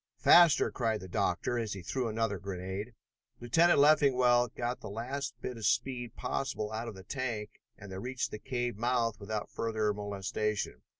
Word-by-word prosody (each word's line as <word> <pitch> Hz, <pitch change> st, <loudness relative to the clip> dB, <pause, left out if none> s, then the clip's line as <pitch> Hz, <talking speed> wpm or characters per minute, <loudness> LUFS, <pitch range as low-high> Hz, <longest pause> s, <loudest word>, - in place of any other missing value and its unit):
"Faster!" 175 Hz, -3 st, +6 dB
cried 115 Hz, -3 st, 0 dB
the 95 Hz, -, -9 dB
doctor, 90 Hz, +6 st, 0 dB
as 110 Hz, -3 st, -2 dB
he 95 Hz, -2 st, -7 dB
threw 125 Hz, +7 st, -2 dB
another 110 Hz, -3 st, -1 dB
grenade. 95 Hz, +4 st, -5 dB, 0.4 s
Lieutenant 165 Hz, +9 st, +4 dB
Leffingwell 130 Hz, -5 st, +5 dB
got 120 Hz, +2 st, -3 dB
the -, -, -8 dB
last 120 Hz, +4 st, -4 dB
bit 125 Hz, -, -4 dB
of 110 Hz, -, -4 dB
speed 120 Hz, +1 st, -1 dB
possible 110 Hz, -6 st, -3 dB
out 110 Hz, +2 st, -4 dB
of 110 Hz, -, -6 dB
the 95 Hz, -, -11 dB
tank 115 Hz, -2 st, -4 dB, 0.2 s
and 105 Hz, -3 st, -11 dB
they 95 Hz, -, -5 dB
reached 130 Hz, +4 st, -3 dB
the 105 Hz, -, -6 dB
cave 120 Hz, -1 st, -2 dB
mouth 115 Hz, -1 st, 0 dB
without 105 Hz, 0 st, -4 dB
further 110 Hz, -2 st, 0 dB
molestation. 105 Hz, -5 st, -3 dB
115 Hz, 170 wpm, -31 LUFS, 105-125 Hz, 0.4 s, Faster